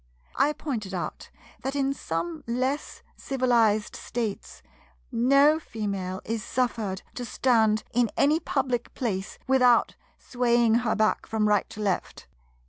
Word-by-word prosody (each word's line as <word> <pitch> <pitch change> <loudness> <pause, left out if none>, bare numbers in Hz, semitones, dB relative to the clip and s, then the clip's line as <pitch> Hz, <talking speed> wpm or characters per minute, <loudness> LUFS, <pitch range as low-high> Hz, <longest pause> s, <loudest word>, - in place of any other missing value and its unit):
I 285 +3 +3
pointed 220 -12 -4
out 175 - -5 0.3
that 270 +1 -3
in 275 -1 +1
some 165 - -4
less 255 +5 -2
civilized 235 -5 +1
States 230 -4 -5 0.5
no 275 +6 +4
female 200 - -4
is 225 -1 -3
suffered 230 -7 -2
to 250 - -5
stand 225 -3 +2
in 240 -1 +2
any 300 +3 +4
public 255 -6 -2
place 195 -6 -3
without 250 -2 +4 0.2
swaying 240 -2 +2
her 225 -3 0
back 215 0 +1
from 220 -1 +1
right 210 -1 +2
to 215 -1 -8
left. 195 -3 -2
235 Hz, 130 wpm, -26 LUFS, 210-260 Hz, 0.5 s, no